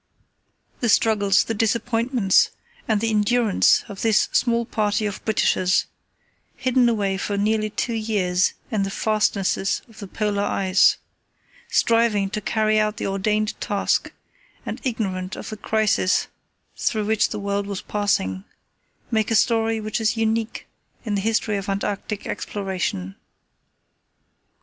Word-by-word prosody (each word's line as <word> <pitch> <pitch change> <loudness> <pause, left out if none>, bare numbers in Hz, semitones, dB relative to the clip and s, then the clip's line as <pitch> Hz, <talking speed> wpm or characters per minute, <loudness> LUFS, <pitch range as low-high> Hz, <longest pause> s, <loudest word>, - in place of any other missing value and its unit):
The 240 - 0
struggles, 200 -2 +3
the 225 - -3
disappointments, 225 -1 +2 0.4
and 220 -2 +2
the 225 0 0
endurance 215 0 +3
of 200 -2 -8
this 220 -2 +3
small 235 -1 +1
party 215 -1 0
of 205 -2 -4
Britishers, 185 -4 +2 0.7
hidden 255 -2 +2
away 200 -4 0
for 200 +1 -2
nearly 215 +1 +1
two 235 +3 -2
years 205 -5 +1 0.2
in 215 -3 0
the 195 - -1
fastnesses 200 -2 0
of 225 -2 -17
the 200 - -7
Polar 205 0 -1
ice, 190 -2 +3 0.7
striving 230 -4 +2
to 215 - -3
carry 215 +1 +1
out 215 0 0
the - - -3
ordained 210 +2 -1
task 200 -1 0 0.5
and - - -5
ignorant 190 -7 -2
of - - -7
the 215 - -6
crises 210 -3 +1 0.5
through 215 -2 -1
which 220 0 +2
the - - -4
world 200 0 -2
was 200 -2 -5
passing, 95 - -1 0.7
make 220 -2 +1
a 225 - +1
story 225 0 +2
which 215 +1 -3
is 220 +1 +1
unique 225 0 -1 0.4
in 215 - -2
the 200 - 0
history 220 0 0
of 195 0 -5
Antarctic 200 +1 -3
exploration. 180 - -3
210 Hz, 135 wpm, -23 LUFS, 200-225 Hz, 0.7 s, struggles